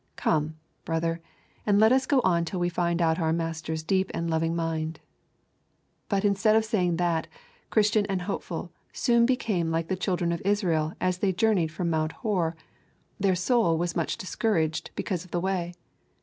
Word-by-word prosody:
Come, 155 Hz, 0 st, 0 dB, 0.3 s
brother, 165 Hz, 0 st, -1 dB, 0.4 s
and 205 Hz, -1 st, +3 dB
let 220 Hz, +2 st, +6 dB
us 260 Hz, 0 st, +3 dB
go 275 Hz, -3 st, +4 dB
on 170 Hz, -4 st, +2 dB
till 180 Hz, +2 st, -4 dB
we 175 Hz, 0 st, +1 dB
find 170 Hz, 0 st, 0 dB
out 160 Hz, +1 st, +2 dB
our 160 Hz, -2 st, +1 dB
Master's 160 Hz, -1 st, -2 dB
deep 190 Hz, +3 st, +1 dB
and 165 Hz, 0 st, -2 dB
loving 165 Hz, +1 st, 0 dB
mind. 165 Hz, -1 st, -2 dB, 1.1 s
But, 200 Hz, 0 st, +1 dB
instead 205 Hz, +2 st, +3 dB
of 220 Hz, 0 st, +3 dB
saying 180 Hz, -7 st, +1 dB
that, 170 Hz, -2 st, 0 dB, 0.4 s
Christian 210 Hz, -1 st, +3 dB
and 190 Hz, -3 st, -2 dB
Hopeful 195 Hz, -, -4 dB, 0.2 s
soon 235 Hz, -2 st, +3 dB
became 210 Hz, -10 st, 0 dB
like 165 Hz, 0 st, -1 dB
the 190 Hz, -, +1 dB
children 180 Hz, -2 st, -1 dB
of 170 Hz, -, -2 dB
Israel 175 Hz, -6 st, +1 dB
as 185 Hz, -1 st, 0 dB
they 195 Hz, -1 st, +2 dB
journeyed 185 Hz, -4 st, +2 dB
from 170 Hz, 0 st, -2 dB
Mount 155 Hz, 0 st, 0 dB
Hor, 180 Hz, -8 st, -1 dB, 0.6 s
their 195 Hz, -2 st, +2 dB
soul 185 Hz, -3 st, +2 dB
was 170 Hz, 0 st, -2 dB
much 165 Hz, -, -1 dB
discouraged 170 Hz, -5 st, -1 dB
because 180 Hz, -4 st, -2 dB
of 180 Hz, -, -16 dB
the 175 Hz, -, -1 dB
way. 180 Hz, -1 st, -1 dB
175 Hz, 175 wpm, -27 LUFS, 165-200 Hz, 1.1 s, let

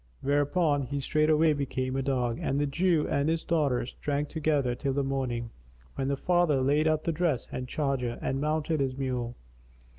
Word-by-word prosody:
Whereupon 145 Hz, +2 st, +2 dB
he 140 Hz, +2 st, -2 dB
straightway 155 Hz, +2 st, +3 dB
became 130 Hz, -2 st, -2 dB
a 135 Hz, -, 0 dB
dog, 125 Hz, -3 st, -1 dB
and 135 Hz, -, 0 dB
the 145 Hz, -, +2 dB
Jew 165 Hz, +2 st, +1 dB
and 140 Hz, +1 st, +1 dB
his 165 Hz, 0 st, 0 dB
daughter 145 Hz, -8 st, +1 dB
drank 145 Hz, 0 st, -1 dB
together 145 Hz, -5 st, +1 dB
till 135 Hz, +2 st, -2 dB
the 140 Hz, +1 st, 0 dB
morning, 125 Hz, -4 st, -2 dB, 0.4 s
when 135 Hz, -1 st, -2 dB
the 140 Hz, 0 st, 0 dB
father 175 Hz, -4 st, +2 dB
laid 145 Hz, +4 st, +2 dB
up 155 Hz, -1 st, +1 dB
the 165 Hz, -, 0 dB
dress 160 Hz, -6 st, 0 dB
and 130 Hz, 0 st, -4 dB
charger 130 Hz, -4 st, -1 dB
and 135 Hz, +1 st, -2 dB
mounted 155 Hz, +1 st, 0 dB
his 135 Hz, -1 st, -1 dB
mule. 125 Hz, -3 st, -2 dB
140 Hz, 180 wpm, -28 LUFS, 130-155 Hz, 0.4 s, straightway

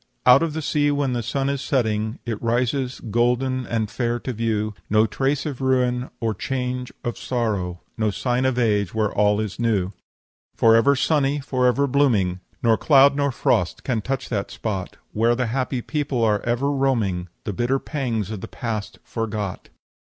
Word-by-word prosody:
"'Out 125 Hz, +2 st, +8 dB
of 165 Hz, -2 st, 0 dB
the 160 Hz, 0 st, -3 dB
sea, 145 Hz, 0 st, +2 dB
when 145 Hz, -3 st, 0 dB
the 120 Hz, -, -1 dB
sun 135 Hz, +4 st, -1 dB
is 140 Hz, -1 st, -1 dB
setting, 110 Hz, -5 st, 0 dB
It 115 Hz, -3 st, -3 dB
rises, 125 Hz, +2 st, 0 dB
golden 125 Hz, +2 st, +1 dB
and 110 Hz, -2 st, -1 dB
fair 120 Hz, +1 st, -1 dB
to 130 Hz, -, -3 dB
view; 110 Hz, -1 st, -1 dB, 0.2 s
No 110 Hz, +1 st, +4 dB
trace 135 Hz, +5 st, -1 dB
of 140 Hz, -4 st, -4 dB
ruin, 125 Hz, -1 st, +1 dB
or 115 Hz, -1 st, 0 dB
change 125 Hz, +1 st, -3 dB
of 120 Hz, -, -3 dB
sorrow, 100 Hz, -8 st, -2 dB, 0.2 s
No 110 Hz, -1 st, +2 dB
sign 125 Hz, +4 st, 0 dB
of 130 Hz, -2 st, +1 dB
age 105 Hz, -5 st, +1 dB
where 110 Hz, -2 st, +1 dB
all 105 Hz, 0 st, +3 dB
is 105 Hz, -3 st, -4 dB
new. 105 Hz, -6 st, +1 dB, 0.6 s
"'Forever 115 Hz, +5 st, +5 dB
sunny, 145 Hz, 0 st, +1 dB
forever 130 Hz, 0 st, +2 dB
blooming, 115 Hz, -10 st, +2 dB, 0.2 s
Nor 115 Hz, -2 st, +4 dB
cloud 140 Hz, -1 st, +6 dB
nor 140 Hz, -1 st, +1 dB
frost 90 Hz, -7 st, 0 dB
can 120 Hz, -4 st, -1 dB
touch 135 Hz, +4 st, -3 dB
that 100 Hz, -4 st, -2 dB
spot, 95 Hz, -5 st, -4 dB, 0.2 s
Where 115 Hz, +2 st, +3 dB
the 125 Hz, +1 st, 0 dB
happy 130 Hz, -2 st, -1 dB
people 145 Hz, -5 st, -1 dB
are 105 Hz, -2 st, +3 dB
ever 120 Hz, +4 st, 0 dB
roaming, 115 Hz, -10 st, 0 dB, 0.2 s
The 105 Hz, -, -3 dB
bitter 120 Hz, +7 st, +1 dB
pangs 120 Hz, -, -3 dB
of 105 Hz, -4 st, -5 dB
the -, -, -6 dB
past 110 Hz, -4 st, -4 dB
forgot.' 105 Hz, -4 st, -4 dB
120 Hz, 170 wpm, -23 LUFS, 110-135 Hz, 0.6 s, Out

